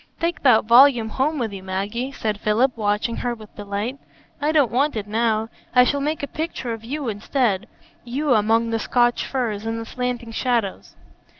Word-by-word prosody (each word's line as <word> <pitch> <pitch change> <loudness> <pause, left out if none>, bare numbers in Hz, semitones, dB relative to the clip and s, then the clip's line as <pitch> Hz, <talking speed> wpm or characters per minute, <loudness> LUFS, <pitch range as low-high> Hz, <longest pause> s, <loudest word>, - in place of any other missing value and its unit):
"Take 335 0 -1
that 245 -6 +5
volume 240 -1 +6
home 285 +7 0
with 230 -6 -2
you, 195 - -7
Maggie," 200 +7 -3
said 215 -6 -3
Philip, 230 +5 +2
watching 210 +1 -1
her 245 -1 -2
with 215 -2 -14
delight. 205 +6 -4 0.4
"I 295 +2 +2
don't 290 -6 +3
want 280 +3 +1
it 210 -2 -3
now. 220 +1 0 0.3
I 250 - +8
shall 280 +3 0
make 300 +1 -2
a - - -1
picture 305 -6 -4
of 225 -1 -8
you 275 +3 -4
instead,—you, 240 +4 -2
among 225 +1 +2
the 225 - 0
Scotch 240 +2 +1
firs 230 -6 -2
and 225 0 -3
the 225 - -6
slanting 245 -1 -4
shadows." 230 -4 -2
235 Hz, 180 wpm, -22 LUFS, 215-265 Hz, 0.4 s, I